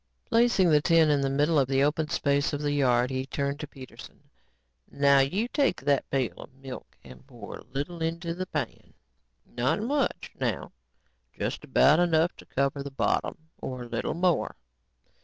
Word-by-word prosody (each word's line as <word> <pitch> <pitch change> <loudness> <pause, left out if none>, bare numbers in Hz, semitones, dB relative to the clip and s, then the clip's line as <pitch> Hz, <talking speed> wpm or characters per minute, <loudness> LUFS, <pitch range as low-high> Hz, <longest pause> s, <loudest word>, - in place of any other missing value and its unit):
Placing 230 -7 +3
the 150 -1 +5
tin 165 0 +4
in 145 -1 +2
the 135 - 0
middle 145 +3 +2
of 135 - +2
the 135 0 +2
open 150 +1 0
spaces 140 +1 +1
of 145 - -2
the 145 - 0
yard, 125 -3 +2
he 130 0 -3
turned 140 +1 -2
to 150 - -5
Peterson. 130 -3 -13 0.6
"Now 140 0 +4
you 185 - +1
take 275 -6 +1
that 140 0 +1
pail 130 -9 0
of - - -11
milk 135 -1 -10
and 65 -1 -14
pour - - -9
a - - -13
little 145 +7 -5
into 165 +1 -2
the 185 +2 -5
pan. 145 -9 -5 0.5
Not 125 +9 -1
much, 275 +2 -1
now, - - -2 0.7
just - - -3
about 150 +4 +4
enough 170 -1 +2
to - - -14
cover 140 +1 -1
the 140 - -5
bottom 135 - -1 0.2
or 125 -1 -5
a - - -9
little - - -2
more." 175 0 +1
145 Hz, 175 wpm, -27 LUFS, 135-165 Hz, 0.7 s, the